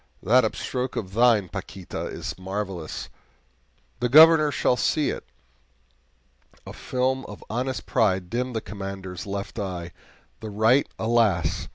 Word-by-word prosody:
that 125 +6 +5
upstroke 125 +3 -3
of 95 -3 -4
thine, 115 -4 +4
Paquita, 95 -1 -6
is - - -5
marvelous; 95 -3 -5 0.9
the 125 - 0
Governor 155 +2 +8
shall 125 - +1
see 150 +3 +1
it!" - - -6 1.4
A - - -8
film 130 +1 -1
of 105 - -10
honest 125 +3 -2
pride 95 -5 +1
dimmed 125 +3 -3
the 110 - -1
Commander's 95 -3 -7
left 100 +2 -5
eye 90 -4 -4 0.5
the 110 - -7
right, 110 +6 +3
alas! 110 -9 +1
110 Hz, 130 wpm, -25 LUFS, 95-125 Hz, 1.4 s, Governor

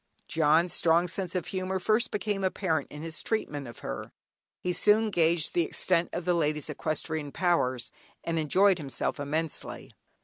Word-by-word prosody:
"John's" 160 +2 +3
strong 170 +1 +3
sense 185 0 -1
of 180 - -1
humour 185 0 -2
first 215 +5 +2
became 205 -1 -2
apparent 180 -5 0
in 150 +1 -8
his 165 0 -5
treatment 145 - -2
of 120 - -10
her. - - -5 0.5
He 180 - -1
soon 215 +3 +3
gauged 165 -2 +2
the 175 - +3
extent 170 +1 +1
of 175 - -4
the 180 - +3
lady's 150 -2 0
equestrian 155 0 -3
powers, 130 -10 0 0.3
and 165 -1 -1
enjoyed 185 +5 +4
himself 140 -2 -2
immensely. 155 +2 -3
170 Hz, 160 wpm, -28 LUFS, 150-185 Hz, 0.5 s, enjoyed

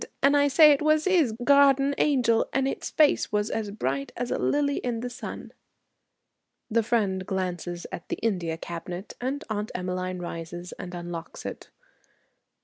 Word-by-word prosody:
And 280 +1 +5
I 285 0 +4
say 300 +2 +7
it 285 - +2
was 310 0 +3
'is 350 -10 +3
garden 280 0 +5
angel, 245 -6 +2
and 270 +1 +2
its - - -3
face 300 -2 +3
was 210 +1 0
as 220 -2 -2
bright 140 -9 -3
as 245 0 -3
a - - 0
lily 285 -1 +1
in 235 -2 -2
the 245 0 -4
sun."' 245 - -8 1.2
The 230 +1 +3
friend 205 -5 0
glances 175 -2 -3
at - - -8
the - - -1
India 175 -7 -1
cabinet, 175 +3 -7
and 275 +4 -2
Aunt 210 -1 -3
Emmeline 185 0 -3
rises 175 0 -6
and 180 0 -6
unlocks 175 -1 -7
it. - - -7
220 Hz, 160 wpm, -26 LUFS, 180-275 Hz, 1.2 s, say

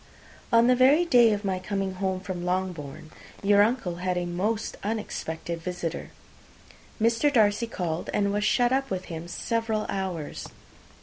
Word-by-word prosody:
On 230 0 +6
the 250 +1 +5
very 275 +7 +5
day 240 -8 +6
of 205 0 -2
my 190 -1 0
coming 195 0 -2
home 190 0 -2
from 185 -2 -5
Longbourn, 175 -5 -3 0.3
your 205 0 +5
uncle 210 -6 +1
had 180 0 -1
a 175 - -1
most 205 +6 -2
unexpected 170 -6 -4
visitor. 175 -1 -4 0.9
Mr. 230 +6 +3
Darcy 220 -2 +3
called, 175 -6 -3
and 200 -1 +1
was 205 0 0
shut 240 +3 +3
up 270 0 0
with 185 -1 -3
him 165 +1 -6
several 225 +3 -1
hours. 185 -6 -4
195 Hz, 150 wpm, -26 LUFS, 180-225 Hz, 0.9 s, On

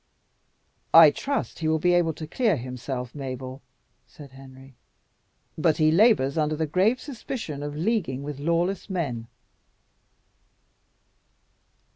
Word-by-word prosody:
"I 165 -2 +10
trust 280 - -3
he 160 - -2
will 160 0 +2
be 175 +3 +2
able 170 -2 +2
to 155 - -7
clear 215 +4 +1
himself, 125 0 -6
Mabel," 130 -1 -7 0.5
said 145 -3 -14
Henry, 135 0 -14 0.9
"but 155 -1 +2
he 155 -1 +3
labours 165 - +3
under 155 0 0
the 160 +1 -1
grave 190 - +1
suspicion 235 - -6
of 145 0 -5
leaguing 160 - -1
with 145 -1 -6
lawless 170 +6 -1
men." 135 -12 -3
155 Hz, 120 wpm, -25 LUFS, 135-175 Hz, 0.9 s, I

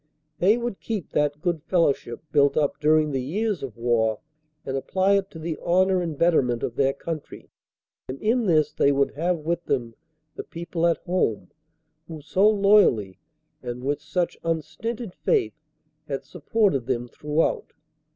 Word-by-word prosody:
They 205 +6 +4
would 240 -4 -4
keep 215 -7 -4
that 150 0 0
good 175 -4 0
fellowship 160 -7 0
built 145 -1 +3
up 145 -2 +1
during 155 0 +3
the 135 -2 -1
years 200 - -2
of 125 -5 -7
war 115 -2 +1 0.5
and 135 - -3
apply 190 +8 +1
it 195 -1 +1
to - - -11
the 160 -1 -4
honor 185 +1 +3
and 165 -4 -4
better 170 -1 +4
ment 120 -2 -2
of 120 - -3
their 135 0 +2
country, 155 +1 -7 0.6
and 130 +1 -5
in 225 +1 +1
this 155 -4 +3
they 140 - +3
would 140 0 +1
have 170 +4 0
with 170 +2 -3
them 120 -4 -1 0.4
the - - -5
people 170 0 -2
at 170 - +2
home 115 - -1 0.6
who 160 -2 -8
so 190 +8 +3
loyally 200 - +3 0.4
and 125 0 -6
with 145 +2 -1
such 170 +4 -2
unstinted 195 +7 -3
faith 425 - 0 0.5
had - - -4
supported 195 - 0
them 120 -2 -1
throughout. 150 +6 -1
160 Hz, 160 wpm, -24 LUFS, 135-185 Hz, 0.6 s, They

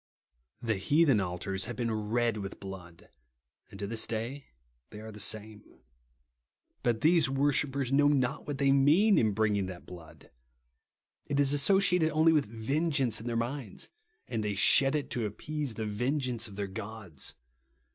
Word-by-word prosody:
The 110 -3 0
heathen 145 - +3
altars 95 +1 -3
have 120 +1 -5
been 115 -1 -2 0.2
red 120 -1 +1
with 100 -2 -6
blood; 90 -4 -10 0.6
and - - -11
to 100 - -3
this 110 +2 -1
day 120 +5 -4 0.4
they 105 - -10
are 110 +1 -9
the 105 - -11
same. 110 0 -1 1.2
But 115 -2 0
these 160 -2 +4
worshippers 135 -1 0
know 145 +1 +4
not 140 -1 0
what 145 -2 -3
they 140 -1 +3
mean, 155 +10 +5
in 110 -3 +2
bringing 105 -2 +1
that 90 -2 -9
blood. 80 -3 -13 1.0
It 140 - -1
is 140 0 +3
asso 190 +7 +4
ciated 180 -4 +2
only 160 +1 +4
with 150 -7 +2
vengeance 135 +2 0
in 115 - -7
their 115 -1 -1
minds; 120 -2 -4 0.4
and 115 -3 -3
they 105 -1 -2
shed 135 +8 +4
it, 150 - -3
to 120 -3 -1
appease 140 +4 -4
the 110 - -3
vengeance 120 +2 -1
of 100 - -12
their 100 0 -3
gods. 100 -5 -6
115 Hz, 165 wpm, -30 LUFS, 105-145 Hz, 1.2 s, mean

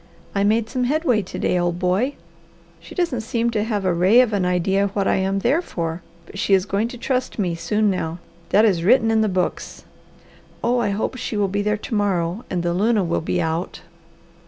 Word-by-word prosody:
I 200 - +1
made 220 +2 +2
some 250 +2 -1
headway 270 -5 +1
to 185 - -8
day, 180 - +1
old 175 0 0
boy. 190 +10 0 0.6
She - - -13
doesn't 335 -10 0
seem 230 +1 -1
to 210 -2 0
have 210 -3 -2
a 185 - +2
ray 185 +7 +5
of 235 -4 0
an 195 -3 +1
idea 190 +3 +1
what 200 -1 +1
I - - +2
am 195 +1 0
there 255 - +2
for, 165 - -4 0.2
but 195 - -10
she 200 -1 +3
is 190 -1 +1
going 205 +2 0
to 245 - -9
trust 255 +1 -2
me 185 -5 0
soon 205 +5 0
now; 165 -3 -3 0.3
that 215 +2 +5
is 180 -6 +2
written 225 +3 +4
in 220 0 +3
the 215 - +1
books. 185 -1 -3 0.8
Oh 245 +1 +2
I 220 -3 0
hope 210 +5 -2
she 235 -3 -4
will 205 -1 +2
be 200 +2 -1
there 210 +1 0
to 220 - -7
morrow, 195 -1 0
and 175 -2 -2
the 170 0 0
luna 210 +3 +2
will 170 -1 -1
be 175 +2 -1
out. 165 +1 -2
205 Hz, 220 wpm, -21 LUFS, 180-230 Hz, 0.8 s, ray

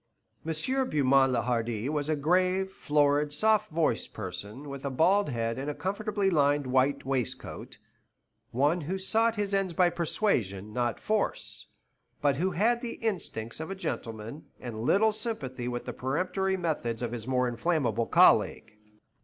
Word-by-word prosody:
M. 255 - -1
Beaumont 135 -2 +4
le 120 -3 +1
Hardi 120 -1 -1
was 150 0 -1
a 155 - +2
grave, 185 +5 +1
florid, 145 -3 +2
soft 215 +7 +2
voiced 155 -7 0
person, 105 +7 -6
with 140 -1 -7
a 140 - -1
bald 180 +8 +3
head 115 -1 -2
and 140 +2 -3
a 145 - -3
comfortably 200 0 -1
lined 145 -3 +2
white 130 +2 +1
waistcoat; 135 -4 -4 0.7
one 145 +8 +1
who 175 +6 -3
sought 225 +4 +1
his 205 -2 -2
ends 195 -3 +1
by 175 +1 +3
persuasion, 110 - -1
not 120 -1 -1
force, 215 -1 -1 0.5
but 140 -2 +2
who 180 +5 +1
had 225 +7 +1
the 240 -2 -4
instincts 160 - -3
of 160 - -5
a 195 - -4
gentleman, 115 - -5
and 115 -3 -6
little 200 - +3
sympathy 175 - -3
with 120 0 -4
the - - -5
peremptory 185 +8 -1
methods 135 -10 -2
of 120 - -2
his 120 -1 -5
more 125 -1 +1
inflammable 120 -1 0
colleague. - - +4
145 Hz, 155 wpm, -29 LUFS, 125-190 Hz, 0.7 s, Beaumont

